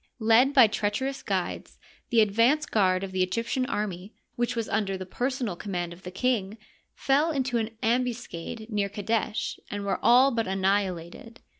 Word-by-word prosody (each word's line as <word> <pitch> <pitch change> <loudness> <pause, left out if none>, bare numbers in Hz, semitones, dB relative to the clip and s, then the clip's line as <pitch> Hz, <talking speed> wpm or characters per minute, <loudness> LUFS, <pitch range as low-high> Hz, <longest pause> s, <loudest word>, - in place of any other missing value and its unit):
Led 230 +3 +4
by 260 -5 +7
treach 205 0 -1
erous 270 +1 -4
guides, - - -3 0.3
the 230 -2 +4
advance 230 +9 +3
guard 185 -6 +2
of 195 - -5
the 185 0 -1
Egyptian 230 +7 -1
army, 205 -5 -4 0.2
which 240 0 -1
was 230 -2 -2
under 195 -3 -1
the 185 - -6
personal 245 0 -2
command 175 -2 -4
of 175 - -15
the 180 - -7
king, 210 0 -1 0.4
fell 285 +4 +2
into 265 -5 0
an 225 0 -4
ambuscade 235 -3 -2
near 205 -1 0
Qadesh 210 +1 -2
and 205 0 -4
were 200 - -1
all 250 +4 +6
but 230 -4 -1
anni 195 +1 +2
hilated. 180 +5 -8
220 Hz, 170 wpm, -27 LUFS, 195-245 Hz, 0.4 s, by